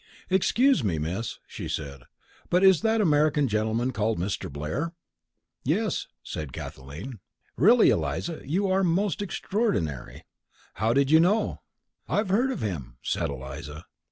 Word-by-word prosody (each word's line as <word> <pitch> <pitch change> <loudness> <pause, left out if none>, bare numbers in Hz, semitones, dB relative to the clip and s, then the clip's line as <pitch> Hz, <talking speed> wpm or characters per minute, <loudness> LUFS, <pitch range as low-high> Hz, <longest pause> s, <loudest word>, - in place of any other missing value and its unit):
"Excuse 225 - +3
me, 90 -7 0
Miss," 90 +9 -3
she - - -7
said, 70 -3 -5 0.4
"but 180 +2 +3
is 190 -3 +6
that 225 0 +2
American 150 -4 +3
gentleman 110 +3 0
called 110 -1 0
Mr. 95 -1 -3
Blair?" 80 - -3 0.7
"Yes," - - 0 0.2
said 75 -1 -6
Kathleen. 80 - -8 0.4
"Really, 220 - +6
Eliza, 170 -2 -2
you 180 +9 0
are 190 +1 +2
most 185 +2 +1
extraordinary. 195 - -2 0.5
How 110 +1 +1
did 140 +3 +2
you 160 - +8
know?" 205 +6 +2 0.5
"I've 210 -1 +1
heard 235 +8 +3
of 260 - -3
him," 70 - -4
said - - -1
Eliza. 70 +4 -7
135 Hz, 135 wpm, -26 LUFS, -, 0.7 s, you